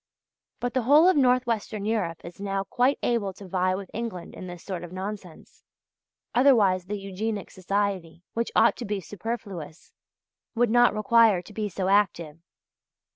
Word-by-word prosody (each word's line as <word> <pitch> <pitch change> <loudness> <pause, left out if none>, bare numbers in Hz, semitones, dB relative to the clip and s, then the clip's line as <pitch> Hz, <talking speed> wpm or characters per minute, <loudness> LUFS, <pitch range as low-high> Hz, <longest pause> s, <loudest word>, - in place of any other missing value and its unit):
But 245 0 -2
the 260 - +1
whole 295 +8 +6
of 370 - +5
North 255 -2 +3
Western 215 -3 -3
Europe 195 -7 -1
is 175 +3 -10
now 195 -1 -1
quite 250 +7 +1
able 220 -5 0
to 195 +1 -12
vie 185 0 +1
with 195 -1 -7
England 220 -7 -5
in 185 - -8
this 175 -1 -9
sort 180 -3 -5
of 175 - -9
nonsense, 190 -2 -8 0.7
otherwise 215 -9 +4
the 210 +1 -3
Eugenic 200 +1 -4
Society, 185 -3 -2
which 230 0 -2
ought - - +5
to 245 - -5
be 205 -1 -2
superfluous, 195 -5 -7 0.6
would 235 -1 +2
not 240 -2 +5
require 220 -4 +4
to 210 - -14
be 210 0 -3
so 185 0 -3
active. 180 -6 +1
200 Hz, 165 wpm, -26 LUFS, 185-230 Hz, 0.7 s, whole